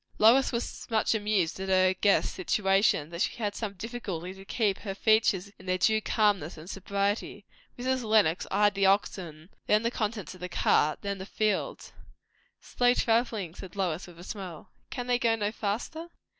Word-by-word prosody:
Lois 240 +5 +5
was 235 -1 -1
so - - -8
much 225 -1 +2
amused 205 -6 0
at 190 0 -4
her 185 0 +4
guests' 200 +2 +2
situation, 195 -4 +1
that 170 +1 -5
she - - 0
had 210 -3 -2
some 210 -2 -4
difficulty 195 -4 -5
to 195 0 -12
keep 200 -1 0
her 195 -3 -5
features 215 -3 +2
in 185 - -14
their 185 0 +1
due 220 +4 +3
calmness 205 -9 +1
and 155 +2 -11
sobriety. 200 +1 -2 0.3
Mrs. 260 +1 -1
Lenox 215 -7 +2
eyed 205 +1 +3
the 195 0 +2
oxen, 180 -4 -1 0.2
then 210 +1 +3
the 235 - 0
contents 215 -5 -3
of 185 - -14
the 180 +1 -5
cart, 155 -2 +2
then 200 -1 -3
the 190 - -6
fields. 215 -2 -2 0.7
"Slow 245 0 +1
travelling!" 225 -7 0
said 185 0 -10
Lois, 180 -3 -2
with 175 -2 -14
a - - -10
smile. 185 -5 -8 0.2
"Can 245 -2 -4
they 245 0 +1
go 230 -2 +2
no 210 -1 -1
faster?" 230 +11 -4
200 Hz, 185 wpm, -28 LUFS, 185-220 Hz, 0.7 s, Lois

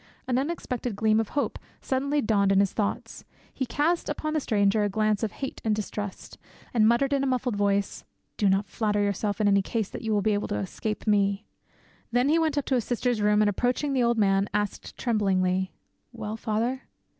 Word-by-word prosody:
An 255 0 +1
unexpected 255 -6 -3
gleam 215 +1 +3
of 225 - -1
hope 285 - 0 0.2
suddenly 280 +2 0
dawned 200 -3 +2
in 195 - +4
his 200 -1 +2
thoughts; 205 -2 -3 0.3
he 260 - -3
cast 325 +7 0
upon 310 +1 -2
the 310 - +2
stranger 210 -4 +2
a 205 - +1
glance 215 0 +1
of 220 -3 -1
hate 270 - -6
and 215 -2 +1
distrust, 205 -1 -6 0.3
and 220 -3 +4
muttered 270 +5 +3
in 275 -1 +1
a - - +1
muffled 250 -3 0
voice, 200 -1 0 0.3
"Do 205 - +2
not 195 +1 +2
flatter 210 +2 -1
yourself, 205 +1 -1
in 210 - +3
any 200 -1 +4
case, 215 +1 -2
that - - -7
you 225 - -2
will 205 -2 +2
be 215 - +2
able 205 - -1
to - - -2
escape 210 - -4
me." 200 -1 +2 0.7
Then 245 +3 +2
he 325 +2 +4
went 315 -3 0
up 285 - 0
to - - -1
his 245 -3 +2
sister's 245 -1 -1
room, 210 0 +4
and 210 - +3
approaching 250 +7 0
the 260 - +2
old 235 -1 +2
man, 195 -1 +2
asked 205 -1 -3
tremblingly, 190 -5 +1 0.4
"Well, 220 -2 -5
father?" 230 +4 -1
215 Hz, 205 wpm, -26 LUFS, 205-250 Hz, 0.7 s, in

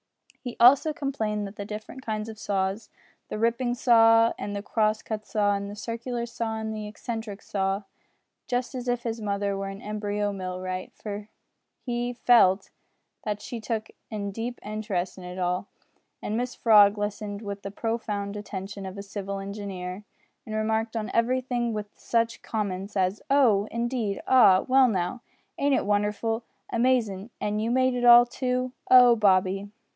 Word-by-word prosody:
He 245 -2 -6
also 260 +6 +7
explained 225 -9 -2
the 200 0 -7
different 215 +5 -8
kinds 215 -1 -3
of 220 -1 -9
saws 195 +2 -2 0.4
the - - -4
ripping 235 +2 +1
saw, 230 -3 +5
and 205 - -4
the 200 - -4
cross 215 0 +1
cut 215 -1 -5
saw, 205 -2 +2
and 200 0 -3
the 205 - -7
circular 235 +2 -4
saw, 230 -1 -3
and 220 0 -4
the 215 -1 -5
eccentric 215 -1 -6
saw 195 0 -1 0.6
just 245 +1 -1
as 250 -1 -5
if 245 -1 0
his 230 -1 -3
mother 200 -1 -1
were 195 0 -3
an 195 0 -8
embryo 205 -1 -2
mill 185 -1 -5
wright, 185 0 -4
for 210 0 -7 0.6
he 240 0 -2
felt 225 -6 +4 0.5
that 210 -1 -2
she 240 - -5
took 220 -1 -3 0.2
a 215 - -3
deep 230 +4 -5
interest 205 -4 -3
in - - -10
it 180 +1 -7
all, 180 +2 -1 0.6
and 215 - -2
Mrs 250 +1 -3
Frog 210 -2 +6
listened 205 0 -4
with 200 -1 -5
the 200 - -5
profound 210 -2 -3
attention 200 -1 -6
of 190 +1 -8
a 200 - -5
civil 200 0 -5
engineer, 195 -1 -6 0.4
and 215 - -4
remarked 220 +1 0
on 215 -1 -3
everything 245 0 +1
with 210 -1 -5
such 230 0 -1
comments 200 -2 -3
as 190 +2 +1
oh! 230 -8 +4
indeed! 235 -4 -2
ah! 220 -8 +6
well 265 0 +6
now! 190 +2 -1 0.4
ain't 280 -1 +3
it - - 0
wonderful? 210 +3 0 0.3
amazin'! 230 -4 +1
an' 210 0 -1
you 220 +2 -1
made 255 +1 +3
it 245 0 -2
all 240 0 +9
too! 255 +1 -2 0.2
Oh! 250 -2 +8
Bobby! 195 -1 +2
215 Hz, 165 wpm, -26 LUFS, 200-235 Hz, 0.6 s, all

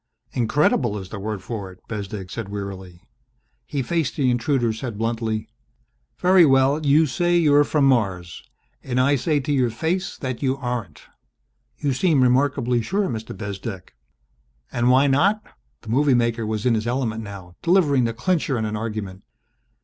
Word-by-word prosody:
"Incredible 120 -2 +1
is 95 -2 -8
the 100 - -6
word 105 -1 -4
for 100 -5 -5
it," 90 - -16
Bezdek 100 -3 -6
said 115 -4 -5
wearily. 95 -3 -7 0.6
He 140 -2 -2
faced 165 +2 -1
the 130 -4 +2
intruder, 120 -2 +1
said 110 -1 -6
bluntly, 110 -1 -2 0.7
"Very 185 0 +5
well, 135 +1 +3
you 150 +2 +4
say 175 +6 +1
you're 145 -3 +5
from 145 -1 +1
Mars. 95 -10 0 0.4
And 125 -1 -2
I 140 +3 +4
say 150 +3 +1
to 145 - -3
your 130 -3 +2
face 165 +11 -2
that 130 -3 -5
you 135 -1 0
aren't!" 120 - -5 0.7
"You 140 -2 -1
seem 145 -1 +3
remarkably 125 -1 +2
sure, 195 - -1
Mr. 110 -3 -6
Bezdek." 100 -2 -6 0.8
"And 120 0 +1
why 130 +2 +5
not?" 190 +11 +2 0.4
The - - -11
movie 135 +3 +3
maker 115 -2 0
was 110 0 -3
in 125 - +4
his 110 0 -1
element 120 -3 -1
now, 100 -4 -10
delivering 155 -8 +3
the 115 - -1
clincher 150 0 0
in 110 - -1
an 105 0 -3
argument. 105 -3 -5
120 Hz, 165 wpm, -22 LUFS, 110-140 Hz, 0.8 s, Very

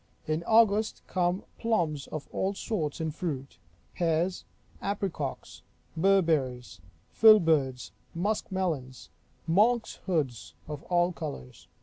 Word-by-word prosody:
In 155 +1 -1
August 220 -1 +3
come 180 0 0 0.2
plums 170 -11 0
of 155 -2 -6
all 195 +1 -1
sorts 160 -9 -3
in 160 -1 -1
fruit; 145 -4 -5 0.3
pears; 170 +2 0 0.4
apricocks; 190 -9 -4 0.3
berberries; 155 - +1 0.3
filberds; 160 - +5 0.2
musk 205 +5 -1
melons; 155 -9 -3 0.4
monks 220 +8 +2
hoods, 120 - -2
of 150 -2 -6
all 175 0 +3
colors. 145 - -8
165 Hz, 100 wpm, -29 LUFS, 145-195 Hz, 0.4 s, filberds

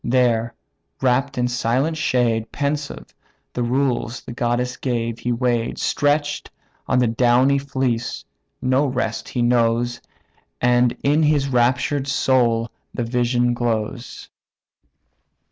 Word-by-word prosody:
There, 120 -2 +1 0.4
wrapped 135 +1 +1
in 125 0 +1
silent 125 +6 0
shade, 115 -6 0
Pensive, 140 - -3 0.4
the 125 - -2
rules 120 -1 0
the - - -9
goddess 120 +1 -1
gave 115 -3 -2
he 120 - -2
weigh'd; 120 -1 0
Stretch'd 145 +1 0 0.4
on - - +2
the 125 - +4
downy 125 +4 +3
fleece, 130 -4 -2 0.4
no 130 +3 +2
rest 125 -4 -2
he 120 - -1
knows, 120 0 +1 0.6
And 125 0 +3
in 145 +3 +3
his 150 -2 +2
raptured 130 +3 +1
soul 120 -4 +2 0.2
the 120 - -3
vision 120 0 +1
glows. 120 +1 -3
125 Hz, 115 wpm, -21 LUFS, 120-135 Hz, 0.6 s, the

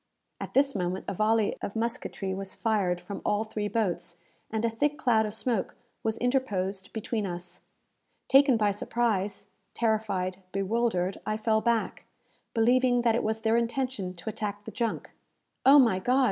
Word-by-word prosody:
At - - -7
this 275 +1 +4
moment 185 -1 -2
a - - -2
volley 215 +2 +2
of 200 - -5
musketry 225 -4 -3
was 195 0 -5
fired 200 -6 +1
from 180 +3 -7
all 210 +1 +1
three 215 -1 -3
boats, 180 -6 -1 0.3
and 220 +1 -1
a - - +3
thick 295 +6 0
cloud 225 -7 +3
of 210 - -5
smoke 225 -2 -1 0.3
was 220 0 -1
interposed 205 -7 -1
between 220 -1 -2
us. 175 0 -6 0.7
Taken 270 -2 +6
by 210 -2 +2
surprise, 205 -1 -1 0.2
terrified, 210 -5 0
bewildered, 195 -2 0
I 215 - -1
fell 220 0 +1
back, 230 0 0 0.5
believing 245 +1 +3
that 230 -2 +4
it 235 - +1
was 220 +1 -1
their 225 +1 +3
intention 235 -5 -2
to 170 +5 -6
attack 205 -1 -5
the - - -6
junk. 230 -3 -2 0.6
"Oh, 280 +2 +9
my 230 -9 +5
God!" 250 +7 +2
220 Hz, 160 wpm, -28 LUFS, 195-235 Hz, 0.7 s, Oh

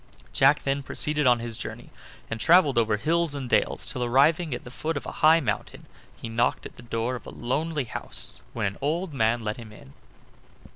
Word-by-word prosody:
Jack 140 +2 +4
then 140 0 0
proceeded 150 +1 0
on 120 -1 +6
his 115 -1 -4
journey, - - -7 0.4
and 115 - -4
traveled 150 -4 +5
over 110 -2 +2
hills 165 +4 +1
and 135 -3 -4
dales, - - +1
till 125 - -2
arriving 150 +7 +3
at 120 - -4
the 125 - -10
foot 155 +4 -3
of - - -6
a - - -5
high 160 +2 +7
mountain 115 -9 -4 0.3
he - - -7
knocked 115 +1 0
at - - -9
the - - -12
door 115 +1 -2
of 125 - -7
a - - -6
lonely 150 +5 -2
house, 115 - -5
when - - -2
an 100 0 -3
old 160 +4 -1
man 115 -2 +1
let 105 0 -3
him 115 -3 -10
in. 70 -10 -15
130 Hz, 205 wpm, -26 LUFS, 115-150 Hz, 0.4 s, high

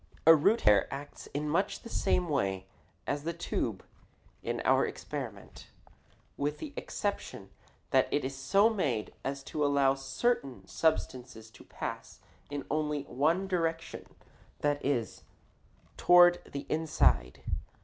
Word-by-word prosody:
A 165 - +10
root 185 +10 +3
hair 105 -2 +4
acts 140 +1 -8
in 150 +1 -3
much 170 +6 0
the - - -8
same 180 -5 +1
way 95 - -1 0.4
as 145 0 -2
the 170 +2 -2
tube 170 - -3 0.6
in - - -3
our - - +4
experiment, - - -6 0.7
with 145 +1 -1
the 295 -2 -7
exception - - -4 0.4
that - - +3
it 145 - 0
is 135 +1 -4
so 140 +11 +4
made 145 - -1
as 135 0 -3
to 150 +2 -2
allow 140 -2 +4
certain 135 - -1
substances 125 -8 -1
to - - -15
pass - - -6 0.3
in 145 -1 -4
only 150 -1 0
one 155 +9 +1
direction, 165 -3 -3 0.5
that 145 -1 0
is, 125 -5 -1 0.8
toward 175 0 +6
the 140 0 -5
inside. 70 - +1
145 Hz, 130 wpm, -30 LUFS, 135-165 Hz, 0.8 s, A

